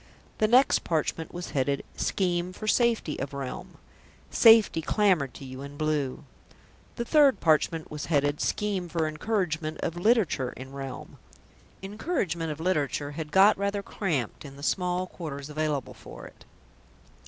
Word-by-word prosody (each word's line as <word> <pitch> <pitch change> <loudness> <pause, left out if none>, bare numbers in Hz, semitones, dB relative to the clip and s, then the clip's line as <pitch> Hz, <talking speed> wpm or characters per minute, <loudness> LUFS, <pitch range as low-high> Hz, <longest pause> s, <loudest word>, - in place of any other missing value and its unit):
The 215 - +4
next 250 +5 +4
parchment 160 0 -2
was 175 0 -6
headed: 140 0 0
SCHEME 180 -1 -1
FOR 215 - -7
SAFETY 230 - +1
OF 140 +1 -5
REALM 135 -2 -6 0.5
"Safety" 225 -7 +6
clamoured 180 - +1
to 135 - -9
you 130 0 -8
in 140 +1 -9
blue. 150 -4 -1 0.7
The 235 - -3
third 280 -6 +5
parchment 160 0 +1
was 150 -1 -5
headed: 145 -2 +1
SCHEME 195 -4 -1
FOR 165 -1 0
ENCOURAGEMENT 160 -2 -2
OF 170 - -3
LITERATURE 180 - +2
IN 130 +1 -9
REALM 135 -2 -8 0.6
"Encouragement 195 - -2
of 150 - -6
Literature" 150 -4 -1
had 150 0 -6
got 200 +2 +6
rather 200 0 -1
cramped 155 - -3
in 140 -2 -10
the 140 - -12
small 180 +2 0
quarters 150 -5 -7
available 150 -3 -2
for - - -11
it. - - -15
160 Hz, 145 wpm, -27 LUFS, 145-200 Hz, 0.7 s, Safety